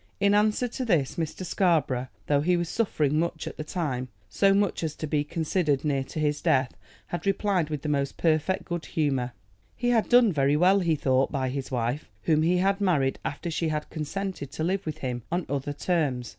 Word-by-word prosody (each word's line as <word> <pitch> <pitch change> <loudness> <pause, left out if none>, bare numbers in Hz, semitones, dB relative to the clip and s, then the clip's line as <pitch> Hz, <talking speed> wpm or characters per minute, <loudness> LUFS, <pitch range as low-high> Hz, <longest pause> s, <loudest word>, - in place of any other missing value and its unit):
In 200 0 +3
answer 215 +4 +2
to 250 +2 -4
this 165 - +1
Mr. 165 +3 -3
Scarborough, 155 -9 +1 0.2
though 145 -1 +2
he 175 +3 +2
was 175 -1 -2
suffering 155 -10 +1
much 165 -1 -2
at - - -7
the - - -4
time, 145 -6 -3 0.2
so 195 -1 +3
much 200 -3 +1
as 155 -2 -2
to - - -4
be 150 -1 0
considered 155 -2 0
near 140 -2 +1
to 155 - -6
his 150 -1 0
death, 130 -1 +2 0.3
had 175 +2 -4
replied 195 -4 +1
with 150 -2 -4
the - - -3
most 140 -2 -1
perfect 165 +4 +1
good 175 -2 -4
humor. 135 -6 -1 0.4
He 245 0 -1
had 230 -3 +2
done 240 -5 +6
very 140 0 +2
well, 185 +4 +5
he 170 -4 +2
thought, 130 -2 +1
by 130 -3 -1
his 135 +1 -4
wife, 125 +2 -2
whom 155 -1 +3
he 175 +3 +3
had 195 +2 +1
married 150 -9 +1
after 165 +4 -4
she 165 +1 -1
had 150 -1 -3
consented 175 0 -4
to 155 - -3
live 190 +2 -1
with 155 -1 -3
him 125 -4 -3
on 175 0 0
other 140 +1 -2
terms. 145 -6 -1
155 Hz, 210 wpm, -27 LUFS, 140-185 Hz, 0.4 s, done